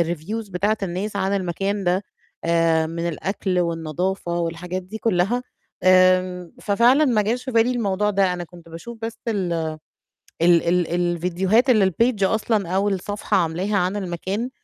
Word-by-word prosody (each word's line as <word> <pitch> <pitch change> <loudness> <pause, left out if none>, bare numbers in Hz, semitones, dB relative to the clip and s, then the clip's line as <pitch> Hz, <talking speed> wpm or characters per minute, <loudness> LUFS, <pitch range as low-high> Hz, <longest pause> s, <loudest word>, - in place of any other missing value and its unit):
الreviews 205 +6 -6
بتاعة 205 +4 0
الناس 195 +3 -3
عن 195 0 0
المكان 195 +2 -2
ده 180 +3 +1 0.4
آآ، 165 -1 +2
من 170 +1 -3
الأكل 185 +2 -2
والنضافة 170 +2 -2
والحاجات 170 +2 -3
دي 200 +5 -8
كلّها. 225 +4 +1 0.4
آمم، 185 -1 +4
ففعلًا 240 +8 +4
ما 230 -5 +3
جاش 235 +5 -1
في 260 - -5
بالي 230 +2 +3
الموضوع 210 -3 0
ده، 195 -2 +2
أنا 175 -1 -4
كنت 170 -1 -15
باشوف 225 +8 -9
بس 225 0 -5
ال 190 -6 -1 0.9
ال 170 -1 +5
ال 175 -1 +2
الفيديوهات 180 +7 +1
اللي 215 -5 +5
الpage 230 0 +1
أصلًا 210 -1 +1
أو 195 +3 +1
الصفحة 205 +2 -1
عاملاها 185 +4 0
عن 185 +2 0
المكان 195 +5 -3
190 Hz, 150 wpm, -22 LUFS, 175-210 Hz, 0.9 s, ال